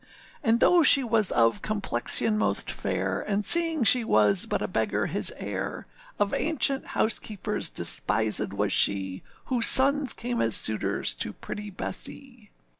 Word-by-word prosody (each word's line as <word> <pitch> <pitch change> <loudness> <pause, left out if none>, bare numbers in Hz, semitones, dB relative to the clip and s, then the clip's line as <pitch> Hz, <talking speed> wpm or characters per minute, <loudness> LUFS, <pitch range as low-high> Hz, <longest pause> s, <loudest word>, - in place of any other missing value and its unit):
And 230 -2 +1
though 350 +6 +4
she 280 -3 +7
was 225 -4 0
of 115 -1 +1
complexion 210 - 0
most 215 - 0
fair, - - -4
And 205 0 -3
seeing 330 -5 +3
she 245 +2 +5
was 105 - +2
but - - -3
a - - -3
beggar - - -2
his - - -2
heir, - - -6 0.3
Of 205 -1 -2
ancient 280 -3 0
housekeepers 215 -2 -2
despisèd 110 -3 0
was 100 0 -2
she, 95 -2 +1 0.2
Whose 245 -3 +1
sons 280 +1 +3
came 240 0 -4
as 115 -2 0
suitors 105 -2 +1
to - - -4
pretty 210 0 -9
Bessee. 235 +3 -7
215 Hz, 145 wpm, -25 LUFS, -, 0.3 s, she